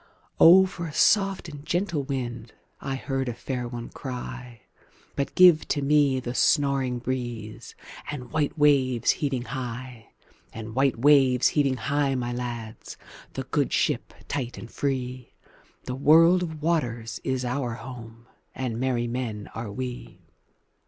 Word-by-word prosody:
"O 185 +3 +8
for 175 -2 -6
a 150 - -8
soft 195 -3 +3
and 145 -3 -9
gentle 170 -1 -1
wind!"I 130 0 -6
heard 135 -1 -2
a 120 - -4
fair 125 0 -4
one 120 -1 -7
cry:But 125 +1 -8
give 180 -4 +6
to 145 - -1
me 140 -2 +3
the 120 -1 -5
snoring 135 -3 +2
breezeAnd 120 +2 -6
white 155 0 -1
waves 130 -5 +3
heaving 135 -5 -1
high; 125 -3 -6 0.4
And 110 -1 -8
white 135 0 +2
waves 130 -1 +5
heaving 140 -3 +1
high, 140 +2 0
my 120 -1 -2
lads, 120 -2 -6 0.4
The - - -4
good - - -1
ship - - 0
tight 125 -3 -3
and 115 - -9
free—The 130 -1 -6
world 165 +6 +6
of 160 -4 -5
waters 120 -9 -1
is 130 -1 -1
our 125 -2 -2
home, 115 -1 -10 0.3
And 120 -3 -3
merry 125 -2 0
men 115 -4 -4
are 115 -2 -5
we. 125 +3 -7
130 Hz, 130 wpm, -26 LUFS, 120-145 Hz, 0.4 s, O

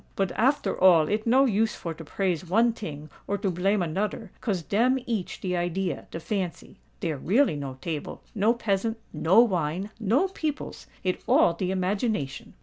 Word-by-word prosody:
"But 195 -2 0
after 235 -3 +1
all 170 -5 +7
it 215 +4 -1
no 260 +4 +5
use 220 -2 +1
for 165 - -5
to 160 - -10
praise 180 +1 -1
one 230 +5 +4
ting 155 -8 -7 0.2
or 200 - 0
to 195 -1 -1
blame 190 +3 +1
anoder—'cause 195 +2 -3
dem 240 +9 +2
each 220 -6 -3
de 180 -1 -1
idea—de 175 -1 -2
fancy. 185 -1 -4 0.2
Dere 160 -4 -1
really 205 - +2
no 140 -2 -5
table—no 195 - -1
peasant—no 220 -3 +1
wine—no 205 - 0
peoples: 310 -5 -4 0.2
it 185 -1 -1
all 170 - +5
de 180 +2 -2
imagination." 190 - -2
195 Hz, 145 wpm, -26 LUFS, 170-225 Hz, 0.2 s, all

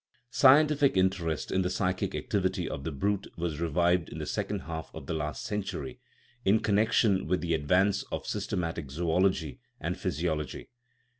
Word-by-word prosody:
Scientific 145 -2 +5
interest 95 -4 0
in 95 - +2
the 90 - 0
psychic 95 +1 -1
activity 95 -3 -1
of 70 - -5
the 80 - -3
brute 100 +8 -1
was 85 -3 -3
revived 85 +1 +2
in - - -8
the - - -4
second - - -2
half 80 -1 -6
of - - -8
the - - -3
last 75 -4 -3
century, 105 +5 -4 0.4
in 105 +3 +4
connection 105 -2 +2
with 90 +2 +1
the 85 -1 0
advance 95 +7 +2
of - - -3
systematic 85 -4 -3
zoology 85 -1 0 0.2
and - - -3
physiology. 80 0 -2
90 Hz, 155 wpm, -29 LUFS, 80-100 Hz, 0.4 s, Scientific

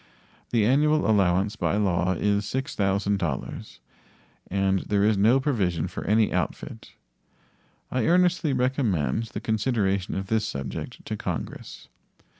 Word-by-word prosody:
The 115 -3 +2
annual 150 +5 +3
allowance 100 0 +2
by 105 - 0
law 95 -3 +1
is 100 +3 0
$6,000, 100 - -2 0.7
and 95 0 +1
there 100 +1 0
is 105 +1 +3
no 110 +7 +4
provision 95 - 0
for 90 - -6
any 110 +1 +2
outfit. - - -4 1.0
I 125 -3 0
earnestly 180 -2 +3
recommend 125 - 0
the 110 - -6
consideration 105 -4 0
of 95 - -3
this 110 +2 0
subject 70 -2 -6
to - - -3
Congress. - - -6
105 Hz, 120 wpm, -25 LUFS, 95-120 Hz, 1.0 s, no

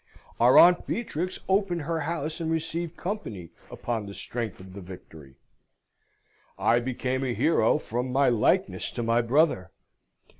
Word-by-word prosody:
Our 120 +2 +6
Aunt 175 0 +6
Beatrix 185 -6 -3
opened 190 -4 +1
her 165 +2 -2
house 160 -1 -3
and 160 - -2
received 165 +1 -3
company 110 - -5 0.2
upon 115 -4 -4
the 100 - -9
strength 115 -5 -5
of 95 0 -12
the 100 - -8
victory. 80 -6 -12 1.2
I 120 - +3
became 130 +1 -2
a 125 -3 -2
hero 155 -9 +3
from 125 +3 -4
my 140 +2 +3
likeness 150 - +1
to 120 - -3
my 115 +1 +2
brother. 120 - +2
130 Hz, 145 wpm, -26 LUFS, 115-165 Hz, 1.2 s, Our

